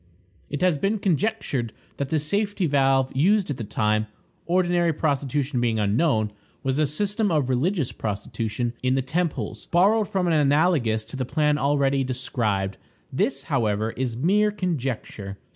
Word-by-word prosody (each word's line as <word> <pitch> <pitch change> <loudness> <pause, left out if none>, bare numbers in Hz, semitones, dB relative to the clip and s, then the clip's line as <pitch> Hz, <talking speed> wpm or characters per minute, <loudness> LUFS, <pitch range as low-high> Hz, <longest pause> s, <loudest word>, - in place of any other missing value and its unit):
It 145 - -4
has 175 -6 +3
been 200 +6 +1
conjectured 185 - -1 0.2
that 140 -1 -3
the 160 - +1
safety 200 +5 0
valve 135 -3 +2
used 190 +5 +3
at 135 - -4
that 115 -5 -6
time, 110 0 +1 0.4
ordinary 175 -1 +2
prostitution 140 -3 -1
being 115 -2 +1
unknown, 110 +1 +1 0.3
was 135 +2 0
a 155 - +3
system 205 +7 0
of 150 -6 +1
religious 145 +3 0
prostitution 115 +3 -3
in 130 +1 +1
the 135 - 0
temples, 135 -8 -2
borrowed 200 +5 +3
from 190 -3 0
and 170 - +2
analogous 145 -7 +2
to - - -9
the 130 - -2
plan 150 +3 +1
already 140 -1 +2
described. 110 -7 -1 0.4
This, 205 - 0
however, 110 -5 0
is 120 -2 -3
mere 200 +10 +3
conjecture. 130 - -4
140 Hz, 150 wpm, -24 LUFS, 120-175 Hz, 0.4 s, has